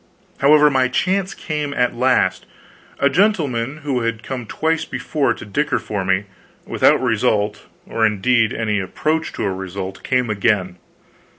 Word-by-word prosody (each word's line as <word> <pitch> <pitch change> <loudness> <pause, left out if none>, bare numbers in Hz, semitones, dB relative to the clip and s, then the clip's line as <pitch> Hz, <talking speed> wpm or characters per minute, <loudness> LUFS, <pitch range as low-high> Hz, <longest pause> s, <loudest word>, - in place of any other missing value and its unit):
However, 150 +1 +6
my 130 -1 +3
chance 190 +7 0
came 150 -2 -4
at 125 0 +1
last. 120 -7 +1 0.5
A 140 - +3
gentleman 150 - +1
who 135 -4 0
had 115 -1 -2
come 125 -4 -5
twice 160 +7 -1
before 150 -3 -1
to - - -10
dicker 145 +9 0
for 100 -3 -4
me, 95 +1 +1 0.4
without - - +3
result, 110 -3 0 0.2
or 115 - -2
indeed 110 +2 +2
any 105 -2 -1
approach 155 - -1
to - - -4
a 100 -2 0
result, 95 0 -6
came 125 -3 0
again. 100 -4 0
120 Hz, 150 wpm, -20 LUFS, 105-145 Hz, 0.5 s, However